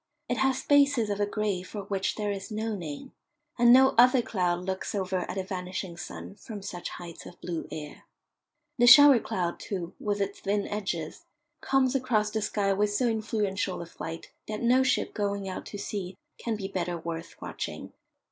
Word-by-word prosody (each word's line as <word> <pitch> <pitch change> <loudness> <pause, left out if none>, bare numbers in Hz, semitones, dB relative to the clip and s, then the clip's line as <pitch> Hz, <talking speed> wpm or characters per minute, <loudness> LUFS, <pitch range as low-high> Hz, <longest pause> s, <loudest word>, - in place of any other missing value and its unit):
It 245 - -1
has 265 +1 +2
spaces 280 -5 +3
of 205 - -2
a 205 - +2
grey 205 -3 -1
for 200 +3 -7
which 195 -1 -1
there 210 -1 -1
is 195 -1 -5
no 220 +1 -2
name, 165 - -7 0.5
and 240 0 +7
no 265 +2 +8
other 250 0 +6
cloud 180 -4 -1
looks 190 +2 -3
over 190 -1 -1
at - - -4
a 190 - -1
vanishing 185 -1 -5
sun 175 - -8
from 205 0 -9
such 180 -3 -5
heights 170 -2 -9
of 175 - -13
blue 170 -2 -4
air. 150 -1 -8 0.7
The 240 - +6
shower 280 0 +10
cloud, 175 -5 -2
too, 180 -4 -5
with 205 -1 -1
its 200 0 -2
thin 205 0 -1
edges, 190 - -4 0.4
comes 270 -1 +2
across 230 -6 +1
the 220 0 -1
sky 200 -1 +1
with 205 +1 +1
so 240 +4 +1
influential 210 -4 -1
a 170 - -5
flight 165 0 -8 0.2
that 215 +1 -4
no 250 +2 +5
ship 260 -1 +1
going 200 -2 -2
out 185 - -5
to 205 - -7
sea 195 -2 -5 0.2
can 230 -2 -2
be 200 -2 -4
better 180 -3 -2
worth 165 0 -6
watching. - - -6
205 Hz, 185 wpm, -28 LUFS, 185-225 Hz, 0.7 s, shower